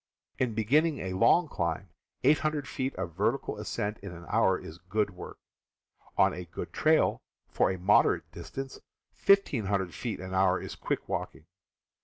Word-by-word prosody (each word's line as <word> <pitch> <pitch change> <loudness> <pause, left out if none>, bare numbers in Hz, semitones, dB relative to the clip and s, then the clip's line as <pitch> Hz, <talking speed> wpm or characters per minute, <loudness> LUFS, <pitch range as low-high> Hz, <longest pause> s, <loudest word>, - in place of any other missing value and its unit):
In 125 -4 0
beginning 145 +8 +3
a 95 -5 -4
long 165 - +4
climb, 85 - -2 0.3
800 150 +1 +2
ft. 130 0 -3
of 90 -2 -4
vertical - - -1
ascent 105 +1 -3
in 100 -2 -8
an 85 -1 -10
hour 100 -4 +3
is 80 +2 -10
good 100 +3 -1
work. 90 - -9 0.8
On - - +5
a 90 - -6
good 85 0 -7
trail, 155 0 +3 0.3
for - - +2
a 95 - -2
moderate 95 +4 +3
distance, 135 0 -7 0.4
1,500 105 - +3
ft. 115 +6 -5
an 95 0 -6
hour 95 0 +3
is - - -7
quick - - -3
walking. - - -4
105 Hz, 155 wpm, -29 LUFS, 95-135 Hz, 0.8 s, On